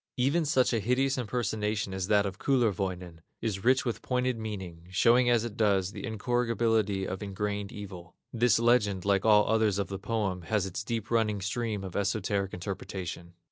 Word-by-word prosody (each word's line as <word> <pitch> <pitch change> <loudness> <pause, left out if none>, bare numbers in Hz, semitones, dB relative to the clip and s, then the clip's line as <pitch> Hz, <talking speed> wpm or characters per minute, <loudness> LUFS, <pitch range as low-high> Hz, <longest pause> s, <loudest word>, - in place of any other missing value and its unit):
Even 140 +6 +2
such 130 -4 +2
a 115 - +2
hideous 130 +5 +1
impersonation 105 -3 -2
as 95 -1 -3
that 105 -1 +3
of 95 -1 -5
Kullerwoinen, 95 -9 -1 0.2
is 100 -4 -3
rich 130 +2 +3
with 120 - -2
pointed 125 0 0
meaning, 95 -6 -6
showing 120 +6 +4
as 120 -1 +3
it 110 -3 -6
does, 100 -4 +2
the 100 -3 -8
incorrigibility 115 -3 0
of 95 +2 -5
ingrained 100 0 -3
evil. 90 -5 -9 0.2
This 120 -3 +3
legend, 115 -5 +2
like 100 0 +2
all 105 -1 +5
others 110 -3 +2
of 100 - -2
the 95 -1 -5
poem, 105 -3 -2
has 100 +3 0
its 95 +1 -4
deep 115 0 -4
running 110 -3 +1
stream 105 0 -2
of 95 -2 -7
esoteric 100 -1 -1
interpretation. 90 -2 -6
105 Hz, 175 wpm, -29 LUFS, 95-115 Hz, 0.2 s, all